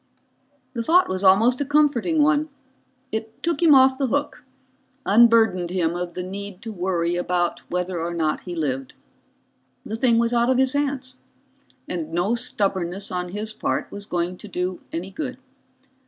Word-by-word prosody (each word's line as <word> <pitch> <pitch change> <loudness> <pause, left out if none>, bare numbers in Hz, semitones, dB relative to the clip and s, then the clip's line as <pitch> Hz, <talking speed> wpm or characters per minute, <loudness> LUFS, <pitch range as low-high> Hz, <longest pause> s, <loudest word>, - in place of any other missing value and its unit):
The 235 - -2
thought 345 +10 +4
was 185 +1 -2
almost 225 +8 +5
a - - +3
comforting 295 +1 +2
one. 295 +1 +2 0.6
It 220 0 -5
took 335 -2 0
him 320 -4 +7
off 260 0 +5
the 270 - +1
hook, 285 +1 -2 0.6
unburdened 225 -5 +4
him 170 -2 0
of 175 -1 -4
the 180 - -3
need 195 +2 -7
to 225 - -5
worry 175 -3 -1
about 175 0 0
whether 180 -1 -2
or 170 +1 -2
not 160 -3 -1
he 175 -1 -7
lived. 135 -5 -3 0.9
The 220 - -4
thing 235 0 +3
was 235 +1 +2
out 235 +1 +3
of 260 - +3
his 265 0 +2
hands, 275 -3 -2 0.7
and 165 -3 -4
no 175 +6 +1
stubbornness 200 -5 -1
on 180 -1 -3
his 210 +3 -4
part - - -2
was 205 0 -7
going 175 0 -2
to 210 - -10
do 180 -1 -3
any 180 +4 -5
good. 255 +3 -5
205 Hz, 170 wpm, -23 LUFS, 180-255 Hz, 0.9 s, him